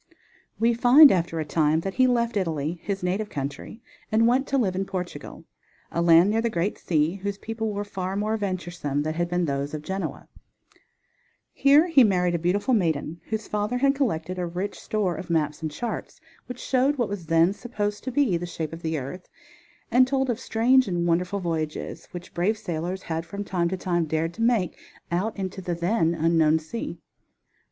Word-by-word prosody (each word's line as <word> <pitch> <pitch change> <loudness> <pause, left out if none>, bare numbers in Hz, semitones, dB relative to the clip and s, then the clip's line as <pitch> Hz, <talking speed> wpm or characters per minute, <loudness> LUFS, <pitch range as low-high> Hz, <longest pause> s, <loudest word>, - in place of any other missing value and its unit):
We 230 +1 +3
find 250 +5 +8
after 170 -2 0
a 155 - -2
time 155 +1 +2
that 195 +2 -4
he 255 +3 +4
left 235 -2 +1
Italy, 165 -3 -1
his 195 -2 -4
native 195 +4 -1
country, 145 - -6 0.3
and 220 +1 +4
went 255 +3 +2
to 275 - +1
live 195 -8 +1
in 190 - 0
Portugal, 185 -2 -6 0.5
a 170 - -1
land 170 +3 +6
near 225 +1 +1
the 235 - 0
great 190 0 -2
sea, 160 +2 0
whose 200 +1 -4
people 225 0 -4
were 205 0 -3
far 190 -2 -4
more 210 +2 0
venturesome 175 -8 -2
than 155 +1 -2
had 175 +1 -1
been 175 0 0
those 140 0 -2
of 150 - -6
Genoa. 190 +3 -4 1.3
Here 285 +4 +5
he 310 -7 +5
married 180 -4 +2
a 170 - 0
beautiful 195 +9 +1
maiden, 165 -5 0
whose 220 -1 -3
father 210 +4 -1
had 275 +2 +3
collected 185 - -2
a 175 - -1
rich 180 +4 -4
store 205 -5 -1
of 180 +2 -8
maps 150 -2 0
and 160 - -2
charts, 230 +9 -5 0.3
which 250 - -6
showed 270 +2 +1
what 240 -3 +1
was 200 -5 -6
then 165 +3 +4
supposed 210 -2 -4
to 260 - -2
be 250 -9 +2
the 175 +1 -5
shape 160 -2 -5
of 165 - -8
the 160 -1 -2
earth 145 +7 -7 0.6
and 255 +2 +5
told 265 -1 +1
of 235 - -4
strange 255 +3 +3
and 175 -2 -1
wonderful 180 +4 0
voyages 160 -2 -4
which 175 0 -9
brave 195 +6 +1
sailors 180 -1 -4
had 160 0 -3
from 200 +5 -6
time 175 -4 -1
to 190 - -2
time 175 -2 0
dared 160 +2 -1
to 225 - -7
make 230 -7 +2 0.4
out 200 +6 -1
into 190 -1 -4
the 175 -1 -2
then 170 -1 +1
unknown 160 -1 +3
sea. 160 +9 -6
185 Hz, 195 wpm, -25 LUFS, 165-220 Hz, 1.3 s, find